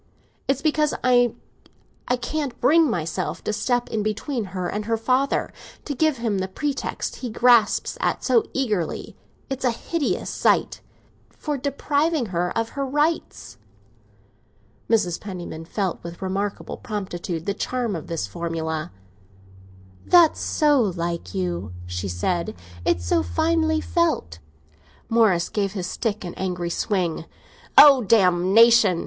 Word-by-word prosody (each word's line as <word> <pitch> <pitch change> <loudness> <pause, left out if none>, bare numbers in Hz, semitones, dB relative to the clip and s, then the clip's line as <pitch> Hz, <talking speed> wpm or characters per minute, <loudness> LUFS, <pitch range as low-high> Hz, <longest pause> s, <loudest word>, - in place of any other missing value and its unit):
It's 275 0 +1
because 305 -1 +2
I 245 -2 +4 0.9
can't 290 -5 -3
bring 310 +4 +4
myself 170 -2 -3
to 215 - -2
step 240 +3 0
in 220 - -1
between 220 +3 -2
her 185 -1 -4
and 210 +3 -3
her 225 0 0
father—to 265 +4 -2
give 310 +1 +1
him 225 -4 -1
the 190 - -2
pretext 280 +8 -3
he 250 - -5
grasps 235 0 +3
at—so 245 -4 +2
eagerly 210 - -2 0.3
(it's 270 -1 -5
a 250 - +3
hideous 290 +6 -2
sight) - - +1 0.5
for 300 -1 -4
depriving 285 +1 0
her 175 +1 0
of 230 0 -1
her 280 +2 -4
rights." 275 - -2 1.3
Mrs. 210 -7 +1
Penniman 175 -5 -7
felt 190 +1 -3
with 170 0 -8
remarkable 195 +2 -3
promptitude 180 -6 -5
the 200 - 0
charm 240 0 -2
of 160 - -7
this 165 -10 -2
formula. 160 +5 -4 1.2
"That's 345 -3 +6
so 295 -4 +2
like 170 - -3
you," 90 0 -3
she 90 +2 -4
said; 170 - -2 0.3
"it's 85 - +1
so 85 - +2
finely 315 - +1
felt." 320 - 0 0.7
Morris 215 -7 +3
gave 200 -2 -2
his 185 -4 -3
stick 210 +1 -3
an 175 - -6
angry 180 -2 -2
swing. 175 -4 -1 0.5
"Oh, 280 -3 +9
botheration!" 195 0 +5
210 Hz, 130 wpm, -23 LUFS, 175-260 Hz, 1.3 s, Oh